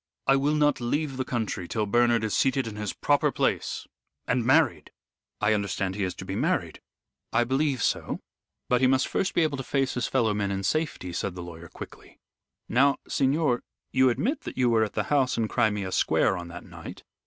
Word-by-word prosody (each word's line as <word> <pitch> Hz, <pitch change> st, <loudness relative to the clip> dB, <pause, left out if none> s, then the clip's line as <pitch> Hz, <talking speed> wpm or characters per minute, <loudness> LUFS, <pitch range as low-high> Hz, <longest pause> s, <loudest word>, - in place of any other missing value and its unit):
I 135 Hz, -, +5 dB
will 145 Hz, +3 st, +2 dB
not 145 Hz, -3 st, +2 dB
leave 140 Hz, +3 st, -1 dB
the 130 Hz, -, 0 dB
country 110 Hz, -7 st, -3 dB
till 110 Hz, +2 st, -1 dB
Bernard 120 Hz, +1 st, +3 dB
is 110 Hz, -, -1 dB
seated 135 Hz, -1 st, +2 dB
in 110 Hz, -2 st, -6 dB
his 105 Hz, -2 st, -3 dB
proper -, -, +2 dB
place, -, -, -1 dB, 0.4 s
and 125 Hz, -, +1 dB
married 130 Hz, -, +3 dB, 0.5 s
I 105 Hz, +1 st, +3 dB
understand 95 Hz, -2 st, -1 dB
he 100 Hz, +1 st, -2 dB
is 90 Hz, -, -2 dB
to 95 Hz, -, -8 dB
be 95 Hz, +1 st, -4 dB
married." -, -, -1 dB, 0.5 s
"I 120 Hz, +1 st, +3 dB
believe 135 Hz, 0 st, 0 dB
so. -, -, -1 dB, 0.5 s
But 125 Hz, 0 st, +2 dB
he 130 Hz, -, +5 dB
must 130 Hz, 0 st, +2 dB
first 195 Hz, -, -1 dB
be 170 Hz, -, +4 dB
able 150 Hz, -3 st, 0 dB
to 135 Hz, -, -4 dB
face 135 Hz, 0 st, 0 dB
his 125 Hz, -, -1 dB
fellow 115 Hz, -5 st, +1 dB
men 100 Hz, -1 st, -1 dB
in 100 Hz, 0 st, -2 dB
safety," 125 Hz, -, -1 dB
said 90 Hz, +1 st, -3 dB
the 90 Hz, -, -6 dB
lawyer, 85 Hz, 0 st, -9 dB
quickly. -, -, -11 dB, 0.5 s
"Now, 140 Hz, +4 st, +3 dB
signor, 135 Hz, -2 st, +1 dB, 0.3 s
you 130 Hz, 0 st, +4 dB
admit 265 Hz, -, -1 dB
that -, -, -8 dB
you 125 Hz, -2 st, +3 dB
were 110 Hz, -1 st, +4 dB
at 105 Hz, -, -3 dB
the -, -, 0 dB
house 135 Hz, -3 st, +2 dB
in 115 Hz, -1 st, +1 dB
Crimea 105 Hz, -5 st, 0 dB
Square 95 Hz, -, +2 dB
on 85 Hz, -1 st, -6 dB
that 85 Hz, +1 st, -9 dB
night." -, -, -10 dB
120 Hz, 205 wpm, -27 LUFS, 100-135 Hz, 0.5 s, I